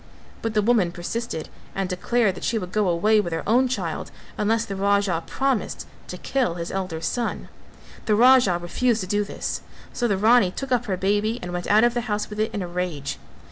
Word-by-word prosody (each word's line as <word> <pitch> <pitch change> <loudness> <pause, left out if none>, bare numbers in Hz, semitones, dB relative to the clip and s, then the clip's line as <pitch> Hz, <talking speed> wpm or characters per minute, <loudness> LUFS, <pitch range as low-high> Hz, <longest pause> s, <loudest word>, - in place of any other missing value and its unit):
But 225 -1 -3
the 210 - +3
woman 215 -6 +3
persisted 175 0 -4 0.3
and 195 -1 -1
declared 195 +3 +1
that - - -10
she 230 - 0
would 180 -4 -5
go 210 -2 +1
away 210 +6 +3
with 175 - -5
her 165 - -2
own 250 +4 +4
child 185 -10 -3 0.3
unless 225 +2 +1
the 200 - -5
Raja 200 -3 +1
promised 270 -3 -1 0.2
to - - -6
kill 255 -11 -1
his 170 0 -5
elder 185 -4 -3
son. 240 +6 -2 0.6
The 215 - +4
Raja 245 -5 +6
refused 225 +7 0
to - - -3
do 205 +2 +1
this, 200 - -4 0.3
so 240 - 0
the 200 -4 +1
Rani 220 -1 +5
took 270 +8 -6
up 245 -1 +2
her 190 -4 -1
baby 205 +4 +1
and 180 - -5
went 175 0 -3
out 215 +2 +5
of 240 0 +4
the 240 - -1
house 210 0 -2
with 210 - -6
it 215 - 0
in 200 - -3
a - - -4
rage. 175 -6 -3
205 Hz, 215 wpm, -24 LUFS, 180-230 Hz, 0.6 s, Raja